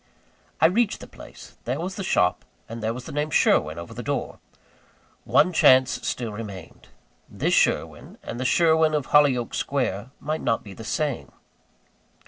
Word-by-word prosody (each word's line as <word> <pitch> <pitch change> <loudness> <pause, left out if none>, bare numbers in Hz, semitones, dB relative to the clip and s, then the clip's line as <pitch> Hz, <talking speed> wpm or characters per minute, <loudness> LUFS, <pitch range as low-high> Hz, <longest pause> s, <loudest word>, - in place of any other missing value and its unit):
I - - +5
reached 205 +6 +2
the - - -10
place: - - -14
there 125 +5 -2
was 185 +3 -4
the 195 - -5
shop, 90 - +1 0.2
and 115 +1 -7
there 110 +1 -1
the 125 +2 -7
name 150 +1 -2
"Sherwin" 80 - +2
over 85 0 -8
the - - -6
door. - - -4 0.9
One 180 - +3
chance 130 -4 +5 0.2
still 120 -3 -3
remained. 100 -5 -9 0.4
This - - -1
Sherwin - - 0
and 120 - -6
the - - -2
Sherwin 160 +2 +3
of 145 -3 -2
Hollyoake 135 -5 +3
Square 125 -5 -2
might 155 +2 -3
not 115 - 0
be 100 - -10
the 115 - -10
same. 145 +3 -3
130 Hz, 160 wpm, -24 LUFS, 110-155 Hz, 0.9 s, I